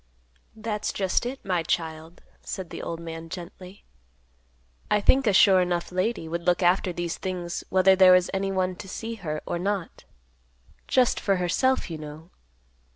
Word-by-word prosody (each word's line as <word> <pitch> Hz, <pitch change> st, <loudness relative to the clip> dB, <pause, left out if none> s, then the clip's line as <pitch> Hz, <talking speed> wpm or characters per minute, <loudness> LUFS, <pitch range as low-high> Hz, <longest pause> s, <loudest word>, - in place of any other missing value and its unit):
"That's 215 Hz, -1 st, -3 dB
just 195 Hz, +4 st, 0 dB
it, 265 Hz, +2 st, -7 dB
my 180 Hz, -3 st, +1 dB
child," 160 Hz, 0 st, -3 dB, 0.2 s
said 185 Hz, -3 st, -6 dB
the -, -, -6 dB
old 165 Hz, -, -5 dB
man 165 Hz, 0 st, -8 dB
gently. 180 Hz, +2 st, -10 dB, 1.1 s
"I 210 Hz, -, +3 dB
think 260 Hz, +4 st, +3 dB
a -, -, +5 dB
'sure 190 Hz, -1 st, +6 dB
enough' 175 Hz, -1 st, -1 dB
lady 185 Hz, -1 st, -1 dB
would 170 Hz, +1 st, -3 dB
look 180 Hz, +1 st, +2 dB
after 180 Hz, +1 st, +3 dB
these 175 Hz, -1 st, -4 dB
things 175 Hz, -2 st, -4 dB
whether 190 Hz, 0 st, +5 dB
there 185 Hz, -1 st, +7 dB
was 180 Hz, 0 st, +3 dB
anyone 190 Hz, -1 st, -1 dB
to 195 Hz, -, -9 dB
see 225 Hz, +3 st, -5 dB
her 155 Hz, -3 st, -3 dB
or 175 Hz, -, -3 dB
not; 195 Hz, -1 st, -3 dB, 0.8 s
just 255 Hz, -2 st, +3 dB
for 195 Hz, -, +1 dB
herself, 185 Hz, +5 st, +1 dB
you 160 Hz, -, -5 dB
know. 155 Hz, +3 st, -10 dB
185 Hz, 160 wpm, -26 LUFS, 170-195 Hz, 1.1 s, there